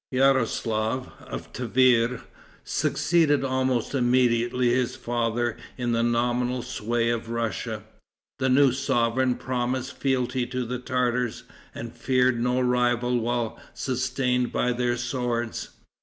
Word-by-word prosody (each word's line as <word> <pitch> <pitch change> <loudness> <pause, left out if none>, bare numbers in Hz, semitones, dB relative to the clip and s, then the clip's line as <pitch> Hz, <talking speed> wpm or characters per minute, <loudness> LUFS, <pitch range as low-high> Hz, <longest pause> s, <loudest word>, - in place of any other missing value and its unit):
Yaroslaf, 130 -3 +1 0.2
of - - -7
Tiver, 125 -1 +2 0.4
succeeded 155 -5 +2
almost 130 -2 0
immediately 120 -1 +2
his 125 0 +1
father 120 -1 -1 0.2
in 120 -2 -1
the 115 0 +2
nominal 120 +1 0
sway 120 -1 -1
of 115 -1 -3
Russia. 115 -2 -3 0.6
The 130 0 +1
new 135 +1 +5
sovereign 125 -1 +1
promised 130 0 -2
fealty 130 -2 0
to 125 0 -3
the 125 +1 -3
Tartars, 125 -1 -1 0.3
and 115 0 -6
feared 125 0 +2
no 125 +1 +1
rival 125 0 +2
while 120 -1 -2 0.2
sustained 125 -1 0
by 125 - +1
their 120 0 0
swords. 120 -1 -2
125 Hz, 115 wpm, -26 LUFS, 120-130 Hz, 0.6 s, new